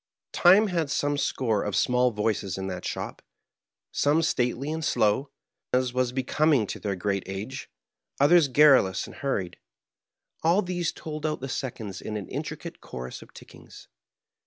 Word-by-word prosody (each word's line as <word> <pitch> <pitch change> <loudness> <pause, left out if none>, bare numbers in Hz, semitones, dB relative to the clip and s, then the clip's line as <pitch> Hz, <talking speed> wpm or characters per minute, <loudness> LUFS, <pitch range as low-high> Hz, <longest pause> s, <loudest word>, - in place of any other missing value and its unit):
Time 190 +5 +6
had 170 -7 -1
some 145 +1 0
score 115 -7 0
of 105 - -2
small 125 0 +3
voices 105 -4 -2
in 95 - -4
that 90 -1 -5
shop, - - -5 0.7
some 150 +3 +2
stately 130 -1 0
and 160 0 -4
slow, 130 0 +1 0.4
as 125 -1 +1
was 125 -1 +1
becoming 135 0 +2
to - - -6
their 100 -2 -2
great 100 +1 -1
age; 100 +7 -6 0.5
others 155 +2 +6
garrulous 130 - +5
and - - -12
hurried. 95 -11 -2 0.8
All 175 +6 +3
these 175 -2 -2
told 155 -1 -7
out 155 -1 -1
the 135 - -5
seconds 115 -7 -5
in 110 - -4
an 100 - -6
intricate - - -6
chorus 65 0 -7
of - - -15
tickings. - - -14
130 Hz, 155 wpm, -26 LUFS, 105-150 Hz, 0.8 s, Time